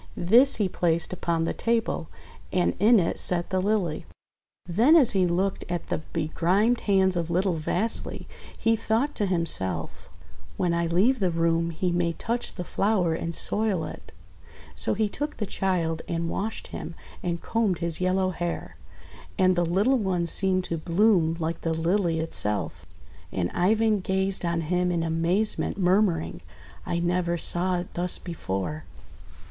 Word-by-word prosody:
This 240 +10 +5
he 210 -3 +1
placed 170 -1 0
upon 170 -2 -1
the - - -1
table, 230 -8 -1 0.4
and 180 -1 +1
in 220 +3 +6
it 170 - -1
set 175 0 0
the 185 -1 +1
Lily. 195 -5 -1 0.6
Then 225 - +4
as 285 -8 +6
he 185 -2 +2
looked 185 +3 -1
at 175 -1 -4
the - - -1
begrimed 180 +8 +1
hands 190 -2 +2
of 170 -1 -2
little 180 +2 +1
Vasily 175 +7 -1 0.3
he 225 0 +2
thought 225 +6 0
to 205 - -1
himself, 95 - -2 0.5
"When 175 -1 +1
I 170 0 0
leave 210 +10 +2
the 190 -3 +2
room 165 0 +1
he 175 +2 -2
may 175 -1 0
touch 235 +8 -3
the 180 - -4
flower 190 -3 +1
and 165 +1 -2
soil 210 -6 +1
it." - - -10 0.6
So 80 - +1
he 215 +1 +1
took 295 +8 -5
the 210 - -2
child 175 -5 -1
and 170 0 -2
washed 220 +2 -4
him, 170 - -6 0.3
and 170 -2 -2
combed 215 -2 0
his 170 +1 -2
yellow 185 +1 +1
hair; 175 -1 -5 0.6
and 185 -2 +4
the 175 - +2
little 205 +10 +2
one 185 -4 0
seemed 185 +2 +2
to 170 - -3
bloom 170 -1 +2
like 165 0 -3
the 165 -1 -1
Lily 170 0 +1
itself. 105 - -2 0.4
And 90 -2 -2
Ivan 215 +3 +2
gazed 190 0 -1
on 170 -1 0
him 180 +2 0
in 170 -2 0
amazement, 165 +6 +1
murmuring, 185 -3 +1 0.5
!<I 170 - -1
never 175 0 0
saw 180 +2 +1
it 175 0 -6
thus 180 +1 -1
before!' 150 - -4
180 Hz, 160 wpm, -26 LUFS, 165-200 Hz, 0.6 s, in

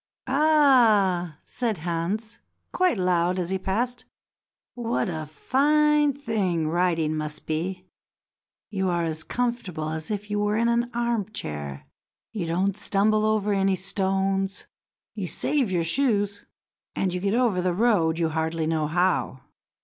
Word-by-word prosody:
"Ah!" 240 - +4
said 230 -5 -2
Hans 175 +7 -3 0.3
quite 365 - +2
loud 180 -1 +1
as 180 0 -2
he 190 - 0
passed, 240 +6 -2 0.7
"what 235 -3 -1
a 155 -3 -4
fine 295 - +3
thing 205 - -1
riding 165 -2 +1
must 155 0 -5
be. 180 +4 -3 0.9
You 190 -2 0
are 175 -1 0
as 160 -1 -2
comfortable 215 -11 -2
as 160 0 -4
if 210 0 -4
you 205 - 0
were 210 +1 +1
in 235 +1 +2
an 235 +1 +1
arm 235 -3 -1
chair; 70 - -5 0.5
you 190 -7 -3
don't 185 +4 0
stumble 215 +2 +1
over 210 -1 +1
any 195 -1 +2
stones; 195 +1 -1 0.5
you - - -4
save 270 -9 0
your 175 -2 +1
shoes, 205 0 0 0.5
and 185 -2 0
you 180 - -2
get 200 +3 0
over 235 -7 +2
the 180 0 +1
road 185 -7 +2
you 165 -1 +1
hardly 160 0 -1
know 155 -1 0
how." 175 -5 0
195 Hz, 140 wpm, -25 LUFS, 170-230 Hz, 0.9 s, Ah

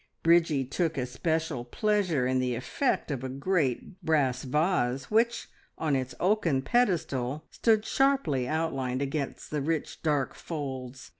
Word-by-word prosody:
Bridgie 165 -5 +4
took 165 +4 -1
especial 140 +2 -1
pleasure 180 - +1
in 130 0 +1
the 125 -1 0
effect 150 - -1
of 135 -3 -3
a 130 - -3
great 145 +3 -1
brass 135 -5 +1
vase 135 -2 0
which, 230 +2 +2 0.3
on 155 -3 +1
its 130 -1 -2
oaken 175 -9 +2
pedestal, 155 - 0
stood 220 -2 +2
sharply 265 - +2
outlined 135 -4 -1
against 140 0 -4
the 150 -1 -1
rich, 155 +1 -2
dark 145 -4 0
folds. 130 -5 -6
150 Hz, 135 wpm, -28 LUFS, 130-170 Hz, 0.3 s, Bridgie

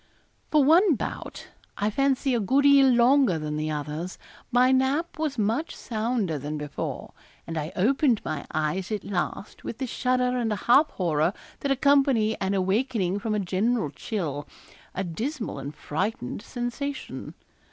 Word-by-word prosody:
For 300 -2 +4
one 330 +4 +5
bout - - -6 0.3
I 210 +1 0
fancy 275 +2 +1
a 240 - +2
good 260 +7 +2
deal 280 -1 +7
longer 245 - +4
than 150 -1 -3
the 155 +1 -2
others 150 +4 -4 0.3
my 250 +2 +5
nap 275 +6 +1
was 305 -4 -1
much 230 +10 0
sounder 220 - -2
than 150 +2 -4
before, 150 -1 -5 0.3
and 165 - -5
I 155 +1 -3
opened 245 +4 +3
my 155 - -4
eyes 155 +6 -1
at 210 -2 -2
last 195 +1 -4
with 230 - -5
the 265 - -2
shudder 250 0 0
and 225 -2 0
half 245 +8 +4
horror 165 -1 0 0.3
that 280 - -1
accompany 275 -5 +3
an 195 +1 0
awakening 195 0 0
from 215 +1 -1
a - - +1
general 195 - 0
chill 150 - -4 0.5
a 190 - -1
dismal 220 - -4
and 140 +1 -5
frightened 155 - -3
sensation. 265 +4 -5
220 Hz, 150 wpm, -26 LUFS, 175-265 Hz, 0.5 s, deal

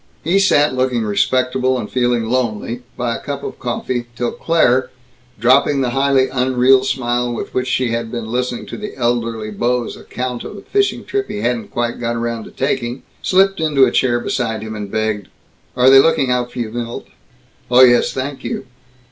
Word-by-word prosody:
He 175 +5 +2
sat 150 -7 +3
looking 130 -2 0
respectable 130 +5 +1
and 115 -4 -4
feeling 120 -2 0
lonely, 120 0 -2 0.2
by 120 -1 -1
a - - -5
cup 140 -1 -5
of - - -6
coffee, 120 0 -3
till 120 -1 -1
Claire 130 -6 +2 0.5
dropping 135 +4 +4
the 125 -2 0
highly 135 0 +2
unreal 130 0 +3
smile 120 -2 -1
with 120 - -5
which 130 0 -1
she 130 -1 0
had 115 -1 -2
been 115 -2 -5
listening 125 0 -2
to - - -7
the 210 -7 -7
elderly 115 -3 -1
beau's 120 +3 -1
account 125 -1 -5
of 205 - -8
a - - -9
fishing 400 0 0
trip 405 -1 -2
he 205 - -5
hadn't 120 -3 -1
quite 120 0 -3
got 120 -1 -2
around 115 -1 -3
to - - -10
taking 125 -2 -2 0.2
slipped 195 +1 +3
into 150 -4 +4
a - - 0
chair 120 -2 +2
beside 115 -3 -2
him 110 0 -6
and 105 -1 -6
begged, 110 -2 -2 0.5
"Are 125 +1 +5
they 135 - +9
looking 135 -3 +3
out 125 -1 0
for 125 - -12
you, 115 -3 -3
Milt?" 120 0 -5 0.6
"Oh 125 +1 +6
yes, 120 -1 +5
thank 135 +1 -5
you." - - -4
125 Hz, 190 wpm, -18 LUFS, 120-130 Hz, 0.6 s, they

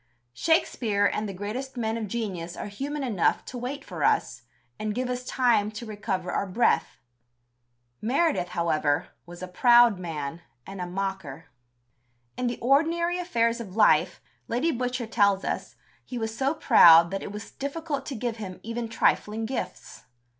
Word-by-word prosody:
Shakespeare 220 - +1
and 210 +1 0
the - - -3
greatest 245 +8 -5
men 220 -1 -1
of 225 -2 -3
genius 190 -6 -4
are - - -5
human 275 +8 -4
enough 215 -9 +1
to - - -9
wait 270 +3 -5
for 170 -6 -5
us, 120 - +1 0.4
and 215 -1 -3
give 250 0 -1
us 250 0 -3
time 240 -5 +2
to 215 +3 -7
recover 205 -4 -3
our 200 - -1
breath. 225 +6 +1 1.0
Meredith, 275 - +1
however, 155 -3 +1 0.2
was 175 +1 -10
a - - -4
proud 240 +2 +5
man, 160 -2 -5 0.2
and 195 -1 -7
a 180 - -3
mocker. 180 -5 -5 0.8
In 250 - -1
the 240 - -2
ordinary 330 +7 +2
affairs 235 -9 0
of 195 -4 -9
life, 220 - +3 0.3
Lady 255 +8 0
Butcher 250 -1 -2
tells 200 -3 +2
us, - - -4 0.3
he 250 - -7
was 225 -1 -3
so 270 +5 0
proud 170 - +7
that 195 - -3
it - - -6
was 210 +1 -8
difficult 285 0 -4
to 275 - -4
give 235 0 -3
him 190 -4 -7
even 230 +1 -4
trifling 225 -1 +1
gifts. 260 +3 -6
225 Hz, 160 wpm, -26 LUFS, 190-250 Hz, 1.0 s, proud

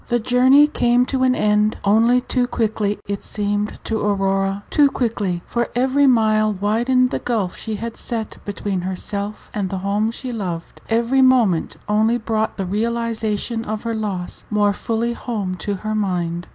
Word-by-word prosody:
The 240 - +2
journey 255 +5 +5
came 245 -4 +2
to 260 0 -2
an 255 -1 +3
end, 210 0 +2
only 230 +5 +4
too 250 0 0
quickly 215 -3 -1
it 200 0 -4
seemed 205 0 -2
to 220 -1 -2
Aurora 195 -1 0
too 290 -2 +5
quickly, 205 -9 -2
for 235 0 -1
every 265 +3 +3
mile 215 -3 +3
widened 235 +6 +1
the - - -1
gulf 215 -7 -1
she 220 -1 -4
had 230 +2 -5
set 225 -2 -4
between 200 -1 -3
Page 180 - -5
149 - - -1
herself 200 +2 -5
and 200 -3 -2
the 195 - -3
home 205 +2 +1
she 250 +2 -5
loved; 180 -7 -5
every 235 +4 +2
moment 240 -10 +3
only 220 +3 +2
brought 220 -1 -2
the 195 - -2
realization 225 +1 -1
of 215 -1 -4
her 230 - -2
loss 200 -5 -4
more 205 -1 +2
fully 230 +3 -1
home 215 -6 -3
to 200 +4 -3
her 215 +3 -4
mind. 175 -4 -2
215 Hz, 175 wpm, -20 LUFS, 200-235 Hz, -, journey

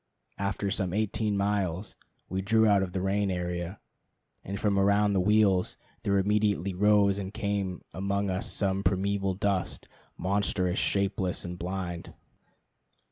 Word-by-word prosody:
After 100 0 -1
some 95 -3 -1
eighteen 105 0 0
miles 100 -2 -1 0.3
we 95 +1 -2
drew 110 +3 +3
out 100 -2 +4
of 95 -2 -2
the 95 0 -2
rain 100 +1 +1
area, 90 +1 -3 0.6
and 100 +1 -5
from 100 -2 +2
around 100 +1 +3
the 95 - +2
wheels 100 -1 +3 0.2
there 100 0 +1
immediately 100 -1 +1
arose 100 +1 +4
and 95 -1 -5
came 100 -4 -2
among 100 +2 -1
us 95 +3 -1
a 95 0 +1
primeval 95 +1 0
dust, 100 -1 -1 0.3
monstrous, 95 -1 0
shapeless, 100 -2 0
and 90 0 -6
blind. 90 -1 -5
100 Hz, 135 wpm, -28 LUFS, 95-100 Hz, 0.6 s, out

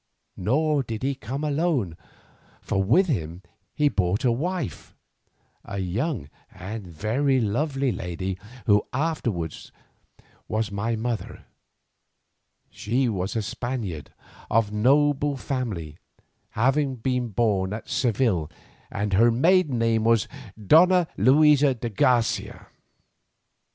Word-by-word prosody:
Nor 145 - +1
did 115 -3 -6
he 140 +1 +1
come 135 +3 -6
alone, 145 - 0 0.6
for 95 - -1
with 170 - +4
him 90 - -3 0.3
he 150 - +3
brought 100 -2 0
a 120 - +4
wife, 165 +4 -4 0.7
a 100 - -6
young 100 - -2 0.2
and 100 +2 -7
very 120 - 0
lovely 135 +4 0
lady, 95 0 -4 0.3
who 105 0 +4
afterwards 120 - -3 0.8
was 110 -1 -2
my 105 +3 -1
mother. 115 0 -4 1.3
She 125 +5 0
was 95 -1 -3
a 110 - 0
Spaniard 105 - -5 0.4
of 110 -2 +2
noble 145 +5 +2
family, 105 - -4 0.6
having 135 +3 +2
been 125 +1 -1
born 100 -3 0
at 110 +2 -6
Seville, 115 - 0 0.4
and 105 0 -3
her 115 +5 +5
maiden 150 +3 +3
name 115 -1 +1
was 115 -1 +3 0.4
Donna 175 - +5
Luisa 140 +3 +5
de 120 0 -4
Garcia. 120 0 0
115 Hz, 110 wpm, -25 LUFS, 100-140 Hz, 1.3 s, her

